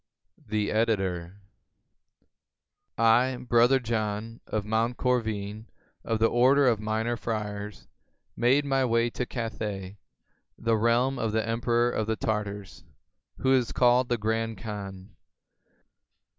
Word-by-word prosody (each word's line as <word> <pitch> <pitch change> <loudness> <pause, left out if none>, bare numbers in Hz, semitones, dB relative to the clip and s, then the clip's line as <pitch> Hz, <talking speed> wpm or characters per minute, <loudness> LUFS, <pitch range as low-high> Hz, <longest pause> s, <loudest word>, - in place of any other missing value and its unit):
The 105 -1 -1
Editor.] 95 -6 0 1.6
I, 120 +3 +4
Brother 120 +3 +4
John, 115 -1 -3
of 105 -2 -2
Monte 110 +3 0
Corvine, 110 -4 -2 0.4
of 115 - -1
the 110 - +3
order 130 +5 +4
of 115 -4 +3
Minor 110 +2 -1
Friars, 105 -2 -5 0.5
made 135 +4 +3
my 135 -1 +1
way 115 -1 +1
to 125 - -3
Cathay, 105 -5 -5 0.6
the 115 0 +1
realm 120 +4 +2
of 110 -1 -1
the 110 0 0
emperor 120 +1 +1
of 110 -2 -2
the 110 - 0
Tartars, 105 -3 -4 0.5
who 130 0 +2
is 125 -3 +2
called 125 0 +3
the 120 - +1
Grand 110 0 -1
Khan. 100 -3 -8
115 Hz, 120 wpm, -27 LUFS, 105-120 Hz, 1.6 s, I